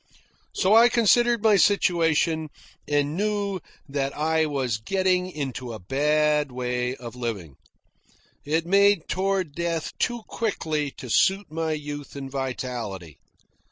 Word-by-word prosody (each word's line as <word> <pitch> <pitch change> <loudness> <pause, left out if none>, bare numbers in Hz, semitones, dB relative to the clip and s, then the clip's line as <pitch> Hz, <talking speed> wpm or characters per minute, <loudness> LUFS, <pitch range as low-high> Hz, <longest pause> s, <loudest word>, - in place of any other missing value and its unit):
So 195 +3 +3
I 235 +2 +7
considered 235 0 +3
my 215 -2 +5
situation 165 -5 +2 0.4
and 145 +1 0
knew 200 -1 -1 0.3
that 140 -1 -3
I 160 +1 +1
was 130 -7 -1
getting 185 - 0
into 130 -7 -5
a 110 - -7
bad 150 +6 +1
way 125 0 -2
of 120 -2 -9
living. 105 - -5 0.9
It 160 +3 0
made 200 -1 +4
toward 190 -4 -1
death 170 0 -3
too 240 -2 -1
quickly 155 -10 -2
to 130 - -8
suit 190 - +2
my 160 0 -1
youth 145 -2 -6
and 135 -1 -7
vitality. 120 - -5
155 Hz, 125 wpm, -25 LUFS, 135-190 Hz, 0.9 s, I